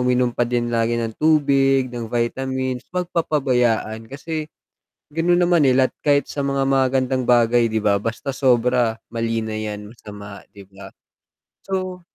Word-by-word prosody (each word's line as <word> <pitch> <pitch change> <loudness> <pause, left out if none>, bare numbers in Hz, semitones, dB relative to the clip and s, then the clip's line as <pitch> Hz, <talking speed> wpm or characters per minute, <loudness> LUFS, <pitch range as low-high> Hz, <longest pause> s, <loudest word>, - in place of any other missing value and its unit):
uminom 125 -1 +1
pa - - 0
din 120 -1 -1
lagi 115 0 +1
ng 115 -1 -3
tubig, 135 -4 +3
ng 115 -2 -5
vitamins, 130 +1 -2
'wag 180 0 -2
papabayaan, 125 -8 0
kasi 155 +3 -5 0.6
ganun 170 +2 +2
naman 175 -4 +3
nila 130 0 +3
at - - -47
kahit 145 -1 +2
sa 145 - -4
mga 140 0 0
magagandang 130 -1 +1
bagay 120 -1 +4
'di 110 -1 -2
ba, 100 -1 +3
basta 115 +5 -4
sobra, 125 -3 +2 0.2
mali 115 -1 -1
na 110 -1 -4
yan, 105 -1 -6
masama, 105 -3 -11
'di 100 - -12
ba? 95 0 -12 0.7
So 185 -1 -4
125 Hz, 155 wpm, -21 LUFS, 115-140 Hz, 0.7 s, bagay